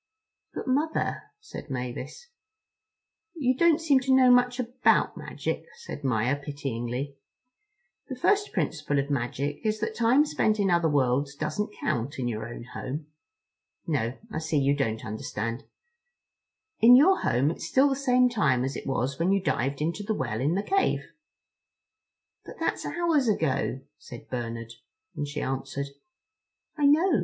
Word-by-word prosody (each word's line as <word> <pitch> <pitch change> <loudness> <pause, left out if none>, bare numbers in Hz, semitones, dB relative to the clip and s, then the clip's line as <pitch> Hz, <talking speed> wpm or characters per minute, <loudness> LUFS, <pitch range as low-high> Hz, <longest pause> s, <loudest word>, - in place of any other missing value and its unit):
"But - - -5
Mother," 295 +5 0 0.2
said 430 - -10
Mavis. 130 - -6 1.1
"You 260 -5 +1
don't 335 +2 +4
seem 295 -5 +4
to 260 0 +2
know 255 -1 +6
much 245 0 +4
about 245 +1 +2
magic," - - -4
said 465 - -9
Maia 125 0 +1
pityingly: 140 -1 -4 0.9
"the 260 - -4
first 410 +10 +2
principle 155 -4 -1
of 140 +1 -1
magic 140 +2 -2
is 215 0 0
that 220 +1 -2
time 235 +6 +4
spent 215 -7 +1
in 195 -2 +2
other 170 -2 +3
worlds 140 0 +1
doesn't 185 +9 -3
count 125 +6 -2
in 125 -2 -2
your 110 -1 -3
own 120 0 -8
home. 145 +3 -6 0.7
No, 130 -6 -1
I 155 - -2
see 160 -1 -1
you 140 0 +3
don't 115 -4 -2
understand. 115 +3 -4 1.1
In 240 +2 +8
your 365 +9 +6
home 135 +5 +2
it's 165 - -6
still 265 +10 +4
the 270 - 0
same 255 -2 +3
time 140 - +1
as 135 +1 -2
it - - -6
was 135 +2 -1
when 175 +3 +2
you 195 - +3
dived 140 -6 -1
into 170 +6 -2
the 215 +1 -2
well 120 - -2
in 150 +6 +1
the 200 - 0
cave." 390 - 0 1.3
"But - - -11
that's - - -1
hours 330 -7 +1
ago," 155 -9 0 0.2
said 120 -4 -12
Bernard; 115 -2 -4 0.4
and 145 - -3
she 150 - -4
answered: 135 +1 -3 0.9
"I 295 -2 +3
know. 320 +5 +4
150 Hz, 155 wpm, -27 LUFS, -, 1.3 s, In